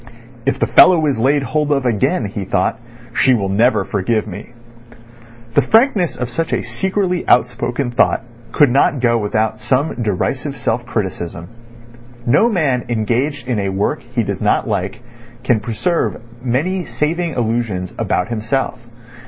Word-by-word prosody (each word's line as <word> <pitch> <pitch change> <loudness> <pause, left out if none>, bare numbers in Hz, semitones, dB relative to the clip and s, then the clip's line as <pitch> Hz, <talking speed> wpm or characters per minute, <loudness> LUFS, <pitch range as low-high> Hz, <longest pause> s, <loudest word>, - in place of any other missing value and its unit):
"If 135 - +2
the - - +1
fellow 170 -4 +6
is 140 -6 0
laid 140 +4 +2
hold 150 +4 -1
of 140 -2 +1
again," 115 -5 +1
he - - -4
thought, - - 0 0.3
"she 130 - +4
will 100 -4 -1
never 105 0 +2
forgive 105 +2 0
me." 105 0 -8 1.0
The - - +5
frankness 220 - +3
of 125 - -3
such 160 +7 -3
a - - 0
secretly 180 - -1
outspoken 125 +1 +1
thought 120 - +2 0.3
could 145 -5 +4
not 140 +1 +3
go 120 -1 +2
without 110 +1 -1
some 130 +7 0
derisive 125 +7 -2
self 120 +2 -2
criticism. 85 -5 -4 0.8
No 145 - +4
man 145 - +1
engaged 120 +5 -1
in 120 -4 0
a 100 -1 -1
work 95 +2 -1
he - - -2
does - - -4
not - - +1
like - - -3 0.4
can 120 -4 +2
preserve 115 - -1 0.2
many 160 +10 0
saving 165 +1 -2
illusions 115 -6 -2
about 90 - 0
himself. 120 +3 -2
125 Hz, 150 wpm, -18 LUFS, 110-145 Hz, 1.0 s, fellow